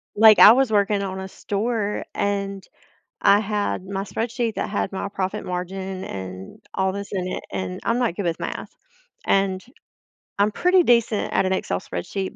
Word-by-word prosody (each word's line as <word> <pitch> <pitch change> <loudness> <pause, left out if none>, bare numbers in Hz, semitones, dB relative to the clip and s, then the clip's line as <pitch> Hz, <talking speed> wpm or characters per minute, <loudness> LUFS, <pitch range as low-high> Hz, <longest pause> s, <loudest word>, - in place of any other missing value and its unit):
like, 215 0 +7
I 210 - +11
was 260 -2 +2
working 205 0 +2
on 190 -1 -4
a 190 - -5
store, 210 +2 -2
and 200 -1 -2 0.6
I 200 +1 +6
had 205 -3 -2
my 195 0 -3
spreadsheet 225 +3 -2
that - - -2
had 205 -2 -2
my 195 +1 -3
profit 190 -1 -3
margin 185 +1 -4
and 95 0 -8
all 190 0 +1
this 200 +1 -6
in 185 -2 -2
it, - - -5
and 95 -1 -4
I'm 235 +1 +1
not 240 -9 0
good 200 - -3
with 165 -1 -2
math, - - -5 0.6
and 195 -1 +2 0.8
I'm 205 +1 +3
pretty 360 - +3
decent 235 -4 +2
at - - +2
an 185 - +1
Excel 90 - -1
spreadsheet, 185 - -5
200 Hz, 175 wpm, -23 LUFS, 190-215 Hz, 0.8 s, I